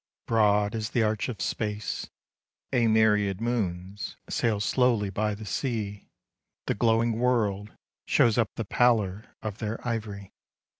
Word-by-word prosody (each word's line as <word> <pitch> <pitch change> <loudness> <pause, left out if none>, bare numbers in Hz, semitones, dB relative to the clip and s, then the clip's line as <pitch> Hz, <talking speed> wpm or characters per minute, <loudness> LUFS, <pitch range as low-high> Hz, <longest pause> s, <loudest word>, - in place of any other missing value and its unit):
I - - -23
troad 105 -2 +3
as 110 0 -2
the 115 - +1
arch 110 +2 0
of 115 - -5
space, 105 -1 -3 0.6
a 120 -3 +3
myriad 105 -3 +3
moons 100 -5 -3
Sail 110 -3 +1
slowly 105 0 +2
by 105 +2 -1
the 110 +1 -9
sea; 105 -3 -3 0.6
the - - +1
glowing 115 +1 +2
world 105 -5 +1 0.4
Shows 115 -3 +4
up 115 - +2
the 115 - -3
pallor 110 -3 +1
of 110 -1 -5
their 110 0 -3
ivory. 105 -4 -4
110 Hz, 140 wpm, -27 LUFS, 100-115 Hz, 0.6 s, Shows